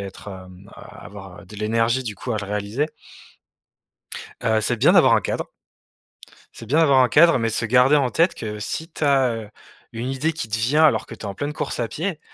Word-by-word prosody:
être, 100 +1 -9
hem, 95 0 -12
avoir, 95 0 -12
heu, - - -18
de 105 +3 -12
l'énergie, 115 +4 0
du 110 -4 -5
coup, 120 +5 -5
à 110 - -1
le 100 - -5
réaliser. 105 +8 -2 1.5
Heu, 110 -1 +1
c'est - - 0
bien - - +4
d'avoir - - +5
un - - +3
cadre - - -4 1.0
c'est 115 - -11
bien 140 +8 +1
d'avoir 140 -4 +4
un 125 - +4
cadre, 165 +3 +5
mais 115 -1 0
se 115 - -1
garder 125 +5 +4
en 135 -4 +1
tête 170 +7 +2
que 105 -2 -6
si 160 +10 -5
tu 155 - -11
as, 135 -3 +3
heu, 110 -2 -7 0.4
une 115 +3 -4
idée 135 +5 -1
qui 130 -8 -5
te 110 - -2
vient 140 +8 +2
alors 155 - +2
que - - -9
tu - - -19
es - - -8
en 100 - -5
pleine 145 +6 -4
course 150 -4 -4
à 115 - -2
pied, 165 - -4
115 Hz, 225 wpm, -22 LUFS, 105-140 Hz, 1.5 s, d'avoir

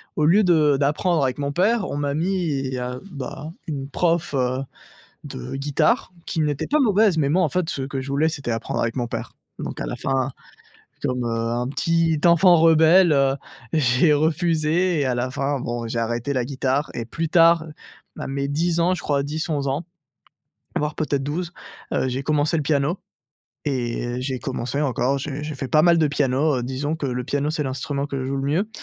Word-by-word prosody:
au 155 - 0
lieu 195 +7 +5
de 155 -5 +4
d'apprendre 150 +3 +1
avec 130 0 0
mon 140 0 -2
père, 205 +7 +2
on - - -3
m'a 145 -1 -1
mis 155 -6 -1
un, 125 +1 -4
bah, 140 +1 -6 0.2
une 140 -3 -4
prof, 165 +2 0
heu, 130 -1 0 0.6
de 60 - -7
guitare 145 - +1
qui 160 - -1
n'était 150 -2 -1
pas 305 +1 +2
mauvaise 210 -6 +3
mais 140 -2 +2
moi, 180 +4 +3
en 155 - +2
fait, 175 +3 -1
ce 135 - -3
que 135 0 -4
je 135 - -7
voulais, 145 +3 +2
c'était 140 -6 -3
apprendre 115 0 -2
avec 115 +1 -1
mon 120 -2 -1
père - - -5 0.3
donc - - -6
à - - -2
la - - -4
fin, 135 0 -1 0.7
comme, 125 -3 -1
heu, 115 - -1
un 115 +2 -1
petit 165 +2 +1
enfant 170 +1 +6
rebelle, 165 +2 +6
heu, 135 -1 +3 0.4
j'ai 145 +1 +4
refusé 160 +2 +1
et 140 - +1
à 125 -2 0
la 125 +1 -2
fin, 140 +1 -1
bon, 120 -1 -3
j'ai 115 - -3
arrêté 120 +4 -2
la 125 -3 0
guitare 135 +1 -1
et 115 - -4
plus 165 +7 -3
tard, 165 -1 +5 0.5
à - - -4
mes 140 0 -2
10 165 +4 0
ans, 180 +2 +3
je 180 - -4
crois, 140 -2 0
10-11 150 -1 -2
ans, 140 +5 -2 0.9
voire 150 0 -1
peut-être 145 -3 -1
12, 170 +4 -3 0.4
heu, 130 - +1
j'ai 130 +2 -3
commencé 150 +2 +1
le 155 - 0
piano 145 +4 +1 0.7
et 120 -4 -1
heu, 120 +1 -3
j'ai 130 0 -3
commencé 125 +2 -3
encore, 135 -1 +1
j'ai 145 +1 -5
j'ai 150 0 -4
fait 135 -1 -4
pas 155 0 +4
mal 170 -1 +5
de 155 - +4
piano, 140 +1 +1
heu, 120 - -3
disons 140 +5 -2
que 150 - -6
le 125 -1 -2
piano, 145 +2 -1
c'est 155 -1 -2
l'instrument 140 +1 -3
que 140 -2 -4
je 130 - -3
joue 135 - -2
le 135 - -2
mieux 195 +7 +1
145 Hz, 205 wpm, -23 LUFS, 130-160 Hz, 0.9 s, enfant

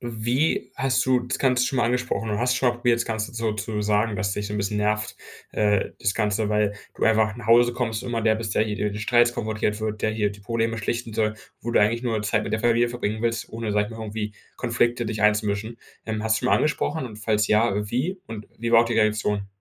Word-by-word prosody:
wie 120 +6 -1
hast 135 -1 +2
du 130 -1 +3
das 125 0 -3
ganze 125 -2 +3
schon 130 -1 -1
mal 120 - +3
angesprochen, 125 -1 -1
oder 105 -1 -1
hast 125 +2 +2
schon 125 0 +2
mal 120 - 0
probiert, 120 -1 +2
das - - -1
ganze 110 -1 -3
so 115 -2 -1
zu 105 +1 -3
sagen, 105 +1 +1
dass 100 0 -1
dich 105 +1 -3
so 105 - -6
'n 105 - -2
bisschen 100 +1 -1
nervt, 105 +1 0 0.4
äh 105 -2 +2
das 100 - +1
ganze, 105 -1 0
weil 105 -1 +1 0.2
du - - -1
einfach 110 -1 +3
nach - - -9
Hause 120 +1 +5
kommst 120 -2 -2
und 125 - -5
immer 115 -1 -1
der 110 0 +3
bist, 110 -2 -3
der - - +3
hier 105 -1 -2
die 105 - -5
Streits 120 +2 +3
konfrontiert 110 -2 -2
wird 110 -1 -3
der 110 - +2
hier 110 -1 0
die 100 0 -12
Probleme 115 +2 -1
schlichten 115 +1 -3
soll, 110 -1 +1 0.3
wo 120 - -3
du - - +4
eigentlich 115 +3 +2
nur 115 -4 -1
Zeit 105 - +1
mit - - -5
der 110 - 0
Familie 120 +1 +3
verbringen 110 -2 -3
willst, 115 -2 -1
ohne, 115 -1 -4
sage 105 0 +2
ich - - -10
mal, 110 - -6
irgendwie 105 0 -4 0.3
Konflikte 120 0 +1
dich 110 -1 -3
einzumischen. 105 +1 +1 0.3
Ähm, 110 -1 -3
hast 110 0 +2
du - - -2
schon 125 - -1
mal - - +6
angesprochen 150 -1 0
und 110 - -10
falls 110 0 +1
ja, 110 +2 +3 0.2
wie 170 +11 -1
und 110 -2 -8
wie 115 +1 -2
war 115 0 +7
die 120 - -2
Reaktion? 105 -2 +1
110 Hz, 250 wpm, -24 LUFS, 105-120 Hz, 0.4 s, war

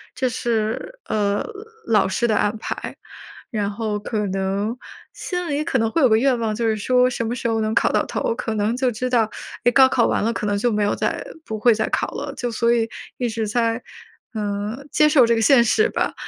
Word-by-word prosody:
这 255 -1 0
是， 235 - -2
呃， 205 -1 0 0.4
老 210 -4 +3
师 235 +5 0
的 215 - +1
安 210 +2 +1
排。 - - -5 0.6
然 205 -2 -1
后 215 0 -2
可 210 -1 -2
能 195 +4 -2 0.4
心 360 -1 -4
里 290 +1 0
可 265 - +1
能 225 0 +1
会 330 - +1
有 - - +7
个 220 - +5
愿 255 0 +2
望， 220 -2 -1
就 230 0 -2
是 220 -1 +1
说 250 +4 +3
什 235 -2 -3
么 235 - -2
时 235 - -3
候 225 0 0
能 215 0 -1
考 - - +3
到 - - +1
头？ 485 -2 -1
可 225 - -3
能 215 +4 0
就 255 -2 +1
知 250 +3 -3
道， 230 -3 +3 0.4
哎， 245 - +6
高 265 +1 +6
考 240 -3 +2
完 - - 0
了 230 - +1
可 210 - -3
能 205 - +1
就 240 +3 +1
没 210 -1 +1
有 205 - +1
再 - - -2 0.2
不 220 -1 -5
会 235 +1 +5
再 220 - -1
考 - - 0
了。 285 -1 -5
就 245 -3 -3
所 235 +1 +1
以 225 -1 +1 0.3
一 245 - -1
直 220 -1 -2
在， 230 +2 0 0.5
嗯， 210 +6 -3
接 300 0 +4
受 275 -5 +6
这 235 - +3
个 225 - 0
现 245 +1 +6
实 430 - +3
吧。 - - -1
230 Hz, 245 characters per minute, -22 LUFS, 215-250 Hz, 0.6 s, 有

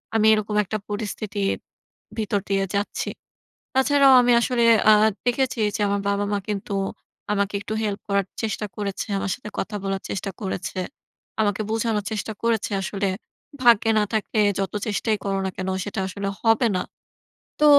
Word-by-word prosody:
আমি 220 -1 +4
এরকম 215 0 -1
একটা 215 +2 -3
পরিস্থিতির 205 -1 -2 0.6
ভিতর 210 -2 0
দিয়ে 195 -1 +2
যাচ্ছি। 200 +1 -1 0.7
তাছাড়াও 275 0 +5
আমি 245 0 +4
আসলে 240 0 +1 0.3
আ - - +9 0.3
দেখেছি 245 +1 +1 0.2
যে - - -6
আমার 200 0 0
বাবা-মা 205 0 0
কিন্তু 205 0 -3 0.6
আমাকে 200 0 0
একটু 215 - -4
হেল্প 205 -1 -2
করার 200 -1 +1 0.2
চেষ্টা 215 -1 -2
করেছে। 200 -1 -3
আমার 195 - -2
সাথে 210 - -9
কথা 210 - -2
বলার 195 0 -2
চেষ্টা 195 0 -3
করেছে। 190 -2 -4 0.6
আমাকে 205 -1 +1
বোঝানোর 220 -2 0
চেষ্টা 220 +1 -3
করেছে 230 -2 +1
আসলে, 195 +1 -1 0.5
"ভাগ্যে 230 -2 +6
না 210 - +3
থাকে 220 0 -1 0.2
যত 195 -1 -1
চেষ্টাই 215 +1 0
করো 195 -1 0
না - - -1
কেন 185 0 -3 0.2
সেটা 205 -1 -3
আসলে 200 +1 -4
হবে 225 +1 +4
না।" 180 - 0 0.8
তো - - +4
210 Hz, 155 wpm, -24 LUFS, 200-225 Hz, 0.8 s, আ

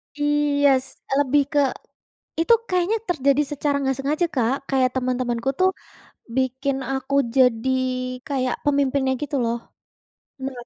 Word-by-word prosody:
Iyes, 285 -2 +2 0.3
lebih 285 +1 +3
ke 290 - +4 0.8
itu 335 +8 +4 0.2
kayaknya 365 +4 +1
terjadi 280 -3 +2
secara 290 0 0
nggak 270 -1 0
sengaja, 300 +5 0
Kak, 245 +1 +2
kayak 260 -2 +3
teman-temanku 250 -1 -1
tuh 375 0 +4 0.7
bikin 265 +1 0 0.2
aku 265 +1 -2 0.2
jadi 250 -1 +3 0.6
kayak 255 -4 -1
pemimpinnya 280 -2 +2
gitu 290 -1 -3
loh. 230 0 0 0.9
Bener. 250 -3 -6
270 Hz, 120 wpm, -23 LUFS, 255-290 Hz, 0.9 s, ke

